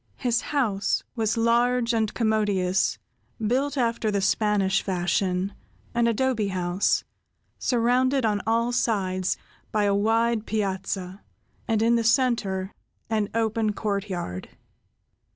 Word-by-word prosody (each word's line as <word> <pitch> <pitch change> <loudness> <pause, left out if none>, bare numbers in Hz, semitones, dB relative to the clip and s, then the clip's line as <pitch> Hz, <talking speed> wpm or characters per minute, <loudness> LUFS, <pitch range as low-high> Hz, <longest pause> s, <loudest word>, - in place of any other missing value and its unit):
His 240 -3 +1
house 225 -9 0
was 220 -2 0
large 235 +1 +2
and 220 -2 +1
commodious, 205 -5 +1 0.4
built 260 +6 0
after 230 -3 0
the 205 -1 0
Spanish 195 -1 +2
fashion—an 190 +5 -2
adobe 230 -2 +1
house—surrounded 235 +7 0
on 210 -2 +1
all 230 +2 +2
sides 190 -6 0 0.3
by 210 -1 +1
a 200 -1 +2
wide 225 +2 +1
piazza, 190 -2 -3 0.5
and 220 -1 +1
in 235 +1 +4
the 230 - 0
center 220 -6 +1 0.4
an 215 -2 +1
open 220 -1 +1
courtyard. 195 - -3
215 Hz, 105 wpm, -25 LUFS, 195-235 Hz, 0.5 s, in